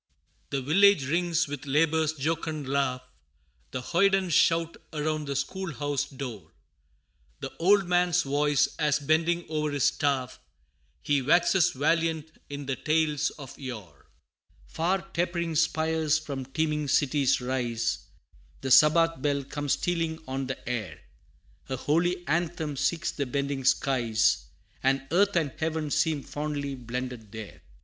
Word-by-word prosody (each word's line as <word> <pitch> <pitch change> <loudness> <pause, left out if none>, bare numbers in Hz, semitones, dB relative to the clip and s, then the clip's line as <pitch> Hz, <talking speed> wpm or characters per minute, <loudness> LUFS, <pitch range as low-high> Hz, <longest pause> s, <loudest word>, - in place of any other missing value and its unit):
The 135 -2 -2
village 195 +1 +5
rings 170 +1 +1
with 145 0 -7
labor's 155 +2 +2
jocund 155 0 -3
laugh, 130 -2 0 0.7
The 125 - -4
hoyden 190 +5 +2
shout 165 +1 +3
around 155 -1 -2
the 140 - -2
school 175 +5 -3
house 145 -1 -2
door, 120 - -7 0.9
The - - -7
old 195 +3 +4
man's 180 0 +3
voice, 145 0 +2
as 150 -2 +2
bending 165 +4 +1
o'er 155 -1 -1
his 145 -2 -1
staff, 140 -3 0 0.6
He 145 -1 +2
waxes 175 +5 +4
valiant 160 +2 0 0.2
in 145 0 -6
the 135 -1 -1
tales 155 +1 +1
of 140 -3 -10
yore: 110 - -9 0.6
Far 175 - -1
tapering 170 -1 -1
spires 160 -1 +1
from 140 -4 -5
teeming 150 +1 -1
cities 140 -1 +2
rise, 120 -3 -2 0.6
The 135 - -3
sabbath 155 +3 +5
bell 140 -1 0
comes 145 +1 -2
stealing 165 -2 -1
on 135 0 -3
the 130 - -6
air, 105 -10 -3 0.7
A 130 - -1
holy 175 +6 0
anthem 160 -2 -1
seeks 165 +4 0
the 140 - -3
bending 140 +1 -2
skies, 120 - +2 0.4
And 135 0 +1
earth 200 +3 +3
and 155 -5 +1
heaven 160 -2 -2
seem 155 -3 +1
fondly 145 -1 -4
blended 125 -3 -6
there! 110 -2 -9
150 Hz, 135 wpm, -27 LUFS, 135-165 Hz, 0.9 s, village